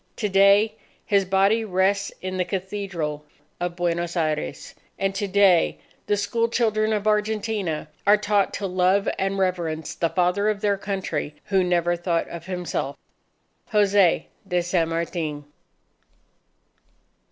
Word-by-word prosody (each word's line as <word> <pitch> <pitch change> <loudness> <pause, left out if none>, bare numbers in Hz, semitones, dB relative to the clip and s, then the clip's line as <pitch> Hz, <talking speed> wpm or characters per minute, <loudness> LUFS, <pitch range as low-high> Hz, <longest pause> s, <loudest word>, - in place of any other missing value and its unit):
To 210 - -1
day, 200 +3 +5 0.3
his 200 -2 +2
body 195 +4 +3
rests 200 0 +1
in 185 0 -3
the 180 - +2
Cathedral 180 -5 -4 0.4
of 175 0 -3
Buenos 175 0 -1
Aires. 155 - -2 0.2
And 195 0 0
to 200 +1 -2
day 195 -3 +4 0.3
the 205 - +2
school 230 +3 0
children 220 -2 +1
of 210 -1 -1
Argentina 210 -5 0 0.2
are 205 +1 +7
taught 205 -1 +1
to 200 - -3
love 185 +1 +2
and 195 +1 0
reverence 175 -4 -1
the 165 - 0
Father 180 +4 +1
of 205 -2 -2
their 205 -1 +2
Country 185 -7 -3
who 190 -2 +2
never 175 -1 +1
thought 170 -1 -1
of 170 +1 -8
himself 175 -6 -3 0.7
Jose 200 -4 +3 0.2
de 180 -2 +1
San 170 -2 +1
Martin. 165 -3 -3
190 Hz, 135 wpm, -24 LUFS, 175-205 Hz, 0.7 s, are